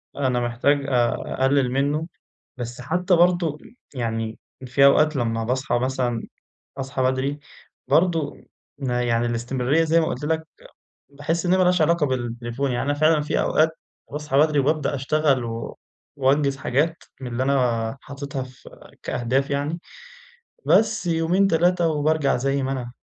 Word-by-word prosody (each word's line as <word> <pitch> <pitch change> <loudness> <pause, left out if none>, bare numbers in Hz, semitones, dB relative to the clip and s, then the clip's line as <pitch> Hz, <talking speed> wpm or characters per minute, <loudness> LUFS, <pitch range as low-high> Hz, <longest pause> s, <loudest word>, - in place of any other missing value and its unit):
أنا 130 -3 0
محتاج 120 +4 +1
أقلل 130 +1 +1
منّه، 145 +4 0 0.5
بس 120 0 -6
حتّى 180 +7 +1
برضو 170 -3 +2
م - - -16 0.2
يعني 115 -3 -3 0.3
في 130 +3 +3
أوقات 150 +2 +5
لمّا 115 -3 -1
باصحى 125 +1 0
مثلًا 125 -2 -1 0.5
أصحى 135 0 -3
بدري 130 +3 0 0.5
برضو 165 -4 +1 0.4
يعني 125 -3 0
الاستمرارية 125 +6 0
زي 165 +1 +3
ما 165 - +1
قلت 130 +4 -4
لك، 160 +1 -1 0.6
باحس 150 +5 -2
إنّها 180 +1 +3
ما 185 - +4
لهاش 180 -1 +3
علاقة 165 0 +3
بالتليفون، 120 0 -3
يعني 120 +2 -1
أنا 145 - +1
فعلًا 155 0 +4
في 150 - -1
أوقات 155 +1 +3 0.4
باصحى 150 -1 -2
بدري 150 0 +4
وبابدأ 145 +1 +1
أشتغل 140 -1 +1
و 115 0 -6 0.4
وأنجز 140 0 +2
حاجات 145 +5 -1 0.2
من 130 - -5
اللي 120 +2 -1
أنا 125 -3 0
حاططها 140 -1 -6
في 130 0 -14 0.3
كأهداف 130 +3 -1
يعني. 145 +4 -2 0.9
بس 215 0 +3
يومين، 170 +4 +2
3 175 0 +2
وبارجع 155 -2 +1
زي 135 +2 0
ما 135 - -1
أنا. 125 -3 -4
140 Hz, 145 wpm, -23 LUFS, 125-155 Hz, 0.9 s, أوقات